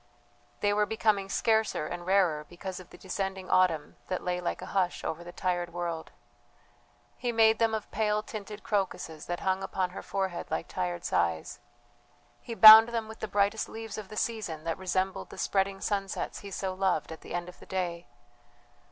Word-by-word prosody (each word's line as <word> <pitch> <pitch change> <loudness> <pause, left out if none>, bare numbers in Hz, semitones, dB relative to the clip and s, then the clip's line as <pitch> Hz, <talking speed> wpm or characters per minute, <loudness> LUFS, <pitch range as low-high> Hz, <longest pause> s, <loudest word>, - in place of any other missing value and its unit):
They 205 0 +3
were 210 0 +2
becoming 210 -2 +1
scarcer 220 -7 +1
and 175 +2 -6
rarer 180 -6 +3
because 185 +1 -7
of 185 - -13
the - - -13
descending 190 0 -4
autumn 180 -5 +2
that 185 - -3
lay 180 0 -1
like 175 - -2
a - - -8
hush 185 -3 0
over 165 +2 -4
the 175 - -9
tired 175 -1 -2
world. 170 -2 -4 1.1
He 245 - -1
made 225 -1 +4
them 225 -1 +2
of 215 - -6
pale 210 -1 0
tinted 210 -1 -8
crocuses 185 -6 -2
that 175 0 -3
hung 190 0 0
upon 185 -1 -2
her 185 - -7
forehead 190 -3 -3
like - - -2
tired 90 -1 -3
sighs 85 -2 0 0.8
he 230 - -6
bound 220 +1 +11
them 230 -2 -2
with 220 0 -10
the 220 - -3
brightest 205 +2 +1
leaves 225 -1 -6
of 205 -3 -9
the 215 - -9
season 205 -9 -2
that 165 +2 -3
resembled 190 +1 -1
the - - -11
spreading 195 0 0
sunsets 200 -1 -2
he 200 - -9
so 190 -1 -3
loved 185 -5 0
at 160 - -8
the - - -7
end 175 0 -3
of 180 - -12
the - - -14
day. 175 -2 -3
190 Hz, 185 wpm, -29 LUFS, 175-210 Hz, 1.1 s, bound